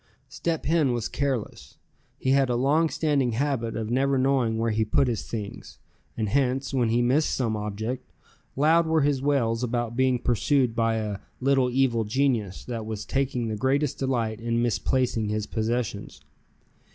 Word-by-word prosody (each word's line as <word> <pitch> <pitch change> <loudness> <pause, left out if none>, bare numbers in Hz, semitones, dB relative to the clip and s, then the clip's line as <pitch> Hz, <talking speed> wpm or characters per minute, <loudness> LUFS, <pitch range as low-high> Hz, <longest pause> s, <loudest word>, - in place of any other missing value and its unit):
Step 165 -2 -3
Hen 150 -5 +2
was 120 -2 -2
careless. 135 -6 -3 0.4
He 130 - 0
had 135 -1 +3
a 120 - +1
long 145 +6 +2
standing 140 -7 0
habit 125 -2 -1
of 110 0 -3
never 135 +2 +2
knowing 130 -4 +2
where 115 0 0
he 110 +1 +1
put 110 +5 +2
his 115 -4 -2
things, 105 -3 -6 0.4
and 110 -2 -1
hence, 135 +1 0
when 125 -4 +2
he 120 +2 +2
missed 135 +6 +2
some 115 -4 -1
object, 105 +2 -4 0.4
loud 160 +4 +4
were 160 -1 +2
his 140 -2 +1
wails 125 -5 +1
about 120 -1 -2
being 130 0 +2
pursued 125 +1 +1
by 115 -1 +1
a 105 -3 -3 0.2
"little 135 -1 +2
evil 125 -3 +2
genius," 110 -4 -1
that 115 -3 -5
was 110 -2 -5
taking 130 -3 -1
the 110 - -2
greatest 135 +5 0
delight 115 -5 -1
in 115 0 0
misplacing 120 -1 0
his 105 0 -1
possessions. 110 -1 -3
125 Hz, 165 wpm, -26 LUFS, 115-135 Hz, 0.4 s, loud